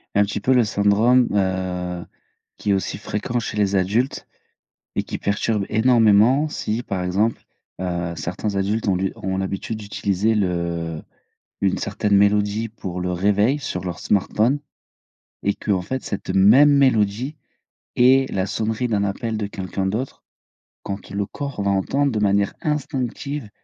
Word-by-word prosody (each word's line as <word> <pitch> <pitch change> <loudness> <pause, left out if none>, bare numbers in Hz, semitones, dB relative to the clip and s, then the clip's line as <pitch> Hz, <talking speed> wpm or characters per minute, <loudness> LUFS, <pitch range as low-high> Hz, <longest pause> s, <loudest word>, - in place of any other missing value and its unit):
Un 105 - +5
petit 105 +1 -3
peu 125 +6 +2
le 125 -2 +5
syndrome, 110 +4 +3
heu, 90 -2 -1 0.5
qui 105 - -1
est - - +5
aussi 95 - -1
fréquent 105 +4 -3
chez 110 - -5
les 100 -1 +2
adultes 105 +8 0 0.7
et - - +1
qui - - -6
perturbe 100 0 0
énormément. 115 +4 +4
Si, 115 -4 -3
par 95 -5 -3
exemple, 100 +5 0 0.4
heu, 85 -2 -2
certains 100 +5 -3
adultes 105 +3 0
ont 95 - +3
lu 95 +1 -1
ont 95 0 -3
l'habitude 95 +3 -3
d'utiliser 100 +1 0
le 85 -4 -2 0.6
une 95 -2 +1
certaine 105 -1 -1
mélodie, 105 +2 +2
pour 95 -5 -6
le 90 0 -2
réveil 105 +9 +2
sur 90 -9 -4
leur 90 -1 -4
smartphone 110 +7 +1 0.9
et 100 - +2
qu'en 95 -3 -1
fait, 130 +8 -4
cette 100 - -5
même 115 +10 +7
mélodie, 130 0 +2 0.6
est 130 +2 +4
la 95 0 0
sonnerie 110 +4 -1
d'un 105 -3 0
appel 110 +3 -2
de 105 - -2
quelqu'un 95 -1 -4
d'autre. 110 +7 -3 0.6
Quand 100 0 -6
le 100 +1 -2
corps 140 0 -5
va 100 - +2
entendre 135 +9 +1
de 110 - -1
manière 100 -1 +2
instinctive, 140 -3 -3
105 Hz, 150 wpm, -22 LUFS, 95-115 Hz, 0.9 s, même